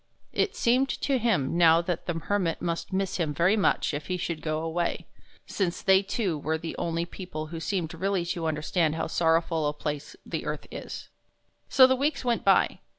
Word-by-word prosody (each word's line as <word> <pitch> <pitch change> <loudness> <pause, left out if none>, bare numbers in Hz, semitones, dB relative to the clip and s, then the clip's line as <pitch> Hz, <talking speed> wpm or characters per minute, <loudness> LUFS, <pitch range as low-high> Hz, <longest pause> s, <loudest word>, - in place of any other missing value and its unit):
It 425 - 0
seemed 260 - +2
to 270 -2 0
him 195 - +1
now 165 -1 +7
that 170 -1 -3
the 175 - -1
Hermit 175 0 -1
must 170 +2 -3
miss 190 0 -1
him 155 -5 -1
very 175 +7 +3
much 200 -6 +1
if 145 +1 -4
he 185 - -1
should 170 -3 -3
go 155 0 -2
away, 170 +1 -2 0.4
since 180 -4 -2
they 190 0 +5
two 195 -5 -2
were 160 +2 -1
the 160 0 -6
only 170 0 -1
people 175 -4 -6
who 165 - -4
seemed 170 -2 -2
really 185 +1 -1
to 170 -1 -2
understand 155 +1 0
how 160 - -1
sorrowful 165 -1 +1
a 145 - -1
place 150 -1 -5
the - - -4
earth - - -4
is. - - -7 0.6
So 260 - +8
the 260 0 +4
weeks 280 0 -1
went 240 -2 +1
by. - - +3
170 Hz, 195 wpm, -27 LUFS, 160-195 Hz, 0.6 s, So